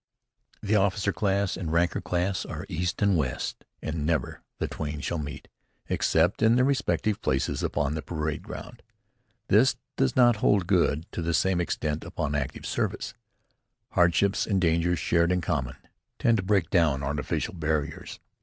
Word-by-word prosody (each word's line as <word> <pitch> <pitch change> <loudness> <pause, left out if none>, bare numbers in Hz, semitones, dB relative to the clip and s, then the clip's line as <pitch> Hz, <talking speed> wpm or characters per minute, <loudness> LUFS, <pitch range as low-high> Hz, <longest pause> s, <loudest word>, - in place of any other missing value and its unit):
The 105 +1 +1
officer 100 0 +2
class 100 -1 0
and 90 - -5
the 80 - -2
ranker 85 +1 +2
class 90 +1 -1
are 85 +2 -6
east 90 +2 -2
and 100 -2 +4
west, 70 -6 -2 0.2
and 80 -1 -3
never 80 0 -1 0.2
the - - -2
twain 75 -1 -4
shall 80 +5 -2
meet, 75 -2 -6 0.4
except 85 +6 +2
in 110 +1 +5
their 125 +1 +4
respective 125 -6 0
places 65 +1 0
upon 75 0 0
the 80 - -3
parade 75 0 -3
ground. - - -9 0.7
This - - +5 0.2
does 65 - +1
not 120 -3 +5
hold 100 -2 +3
good, 85 -4 +2
to - - -4
the 85 0 0
same 95 0 +2
extent, 75 -2 -2
upon 75 -2 -3
active 70 -2 -3
service. - - -2 0.8
Hardships 90 +3 +3
and 100 -3 +2
dangers, 85 0 +2
shared 85 +2 +2
in 90 - +2
common, 75 -8 -2 0.4
tend 115 -1 +3
to 95 - -2
break 95 -4 +1
down 80 -7 +3
artificial 75 +5 -2
barriers. 75 -3 -3
85 Hz, 165 wpm, -27 LUFS, 75-95 Hz, 0.8 s, in